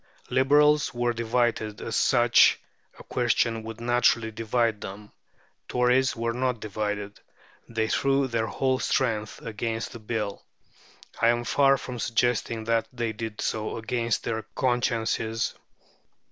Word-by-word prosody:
Liberals 145 Hz, +2 st, +4 dB
were 120 Hz, 0 st, +1 dB
divided, 115 Hz, -2 st, 0 dB
as 115 Hz, -, -4 dB
such 120 Hz, -2 st, +5 dB, 0.4 s
a -, -, -12 dB
question 115 Hz, -1 st, 0 dB
would 110 Hz, 0 st, -8 dB
naturally 120 Hz, -1 st, +2 dB
divide 115 Hz, 0 st, 0 dB
them. 105 Hz, +2 st, -8 dB, 0.6 s
Tories 125 Hz, +2 st, +2 dB
were 115 Hz, 0 st, -2 dB
not 125 Hz, -1 st, -1 dB
divided; 105 Hz, -1 st, -4 dB, 0.5 s
they 115 Hz, -1 st, -1 dB
threw 135 Hz, +3 st, +2 dB
their 115 Hz, -2 st, -1 dB
whole 130 Hz, +1 st, 0 dB
strength 110 Hz, -7 st, -1 dB
against 115 Hz, +1 st, -3 dB
the 120 Hz, -, -9 dB
Bill. 105 Hz, -2 st, -4 dB, 0.8 s
I 115 Hz, -, +5 dB
am 120 Hz, 0 st, +2 dB
far 135 Hz, +3 st, +4 dB
from 125 Hz, -3 st, -7 dB
suggesting 115 Hz, -1 st, 0 dB
that 115 Hz, 0 st, +1 dB
they 120 Hz, -3 st, -3 dB
did 110 Hz, 0 st, -6 dB
so 110 Hz, 0 st, -2 dB
against 115 Hz, 0 st, -1 dB
their 110 Hz, -1 st, -2 dB
consciences. 115 Hz, -2 st, 0 dB
115 Hz, 130 wpm, -26 LUFS, 110-125 Hz, 0.8 s, such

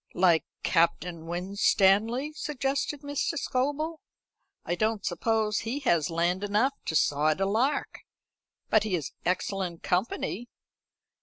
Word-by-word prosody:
"Like 175 Hz, -3 st, +4 dB, 0.2 s
Captain 170 Hz, -1 st, +1 dB
Winstanley," 200 Hz, -, +2 dB
suggested 280 Hz, -1 st, -2 dB
Mr. 285 Hz, 0 st, -1 dB
Scobel. 290 Hz, +5 st, -1 dB, 0.7 s
"I -, -, -1 dB
don't 215 Hz, +3 st, 0 dB
suppose 220 Hz, -2 st, 0 dB
he 255 Hz, +6 st, -3 dB
has 170 Hz, -, +2 dB
land 175 Hz, +3 st, 0 dB
enough 210 Hz, +7 st, +2 dB
to 160 Hz, -, -2 dB
sod 150 Hz, +2 st, +2 dB
a 195 Hz, -, +2 dB
lark. 230 Hz, +9 st, 0 dB, 0.7 s
But -, -, +5 dB
he 210 Hz, -4 st, 0 dB
is 155 Hz, -6 st, -4 dB
excellent 180 Hz, -1 st, -2 dB
company." 205 Hz, +4 st, -1 dB
200 Hz, 120 wpm, -28 LUFS, 175-255 Hz, 0.7 s, But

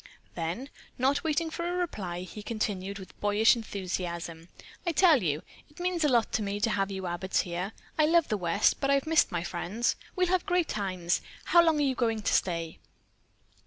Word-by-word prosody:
Then, 175 Hz, +11 st, -4 dB, 0.3 s
not 275 Hz, +3 st, +2 dB
waiting 320 Hz, +1 st, 0 dB
for 340 Hz, -, -5 dB
her 350 Hz, +1 st, -1 dB
reply, 190 Hz, -, -3 dB
he 185 Hz, +3 st, -8 dB
continued 200 Hz, -3 st, -3 dB
with 190 Hz, -2 st, -12 dB
boyish 210 Hz, +3 st, +4 dB
enthusiasm: 175 Hz, -6 st, -5 dB, 0.3 s
"I 345 Hz, -, 0 dB
tell 320 Hz, -6 st, +5 dB
you, 150 Hz, -3 st, -1 dB, 0.3 s
it 295 Hz, -, -17 dB
means 355 Hz, -2 st, 0 dB
a -, -, +4 dB
lot 235 Hz, -3 st, +2 dB
to -, -, +1 dB
me 205 Hz, 0 st, -2 dB
to 225 Hz, +1 st, +2 dB
have 195 Hz, -1 st, 0 dB
you 190 Hz, -1 st, -5 dB
Abbotts 175 Hz, +2 st, 0 dB
here. 180 Hz, +4 st, -4 dB, 0.3 s
I 305 Hz, -, +5 dB
love 335 Hz, 0 st, +4 dB
the 215 Hz, -, 0 dB
West, 175 Hz, -4 st, +2 dB
but 275 Hz, -, +1 dB
I've 275 Hz, -1 st, +3 dB
missed 320 Hz, 0 st, +3 dB
my 175 Hz, -1 st, -1 dB
friends. 185 Hz, +7 st, -1 dB, 0.2 s
We'll 365 Hz, -1 st, +3 dB
have 370 Hz, 0 st, +1 dB
great 360 Hz, -3 st, +2 dB
times! 185 Hz, -4 st, -1 dB, 0.2 s
How 345 Hz, -, +6 dB
long 325 Hz, -2 st, +3 dB
are 295 Hz, -, +2 dB
you 270 Hz, -2 st, +2 dB
going 225 Hz, -3 st, 0 dB
to -, -, +1 dB
stay?" 165 Hz, -3 st, 0 dB
215 Hz, 200 wpm, -29 LUFS, 180-300 Hz, 0.3 s, How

